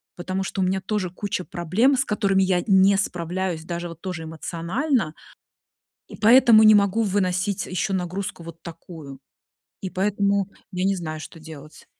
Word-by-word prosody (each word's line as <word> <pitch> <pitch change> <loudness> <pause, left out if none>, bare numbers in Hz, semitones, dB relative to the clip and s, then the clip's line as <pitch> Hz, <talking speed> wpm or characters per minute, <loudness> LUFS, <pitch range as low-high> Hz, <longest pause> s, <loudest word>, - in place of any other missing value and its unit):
потому 185 +2 -3
что 195 - -3
у - - +2
меня 190 +1 0
тоже 190 -2 -2
куча 185 0 -4
проблем, 195 - +1
с 260 - +1
которыми 200 -2 +1
я 185 -2 +1
не 195 -1 +5
справляюсь 180 -2 -3
даже 175 0 -4
вот 165 -1 -11
тоже 180 -3 -5
эмоционально, 170 - -2 0.9
и - - -10
поэтому 230 -1 +6
не 215 0 +8
могу 205 +2 +2
выносить 190 -1 0
еще 185 +2 -2
нагрузку 180 -1 -4
вот 165 0 -11
такую. 160 -5 -10 0.6
И 190 - -5
поэтому 200 0 0 0.2
я 185 0 -2
не 195 0 +1
знаю, 155 -3 -5
что 165 - -10
делать. 155 -1 -12
185 Hz, 160 wpm, -23 LUFS, 170-200 Hz, 0.9 s, не